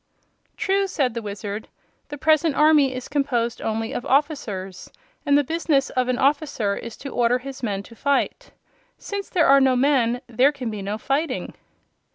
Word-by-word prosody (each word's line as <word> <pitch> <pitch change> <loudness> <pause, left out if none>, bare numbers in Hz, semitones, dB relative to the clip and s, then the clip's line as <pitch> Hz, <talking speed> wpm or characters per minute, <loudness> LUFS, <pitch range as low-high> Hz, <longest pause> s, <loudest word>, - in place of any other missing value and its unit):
"True," 390 0 +1
said 275 -10 0
the 235 - -4
Wizard. 205 0 -6 0.4
"The 290 - -6
present 310 +1 +2
army 300 -3 +5
is 255 - -6
composed 255 -5 -1
only 225 0 -2
of - - -3
officers, 215 - -1 0.4
and 285 0 +5
the 290 - +3
business 300 -2 0
of 255 -1 0
an 255 -1 0
officer 275 -7 +1
is 230 +1 -8
to 280 - -7
order 245 -1 +2
his 270 +1 -9
men 200 -5 -2
to 230 - -15
fight. 280 - -1 0.5
Since 400 -1 -6
there 345 -4 +2
are 275 0 +6
no 260 -1 +4
men 250 -2 +2
there 250 +4 +3
can 255 -6 -5
be 210 -2 -5
no 200 +2 -3
fighting." 275 +4 -2
265 Hz, 175 wpm, -23 LUFS, 230-290 Hz, 0.5 s, are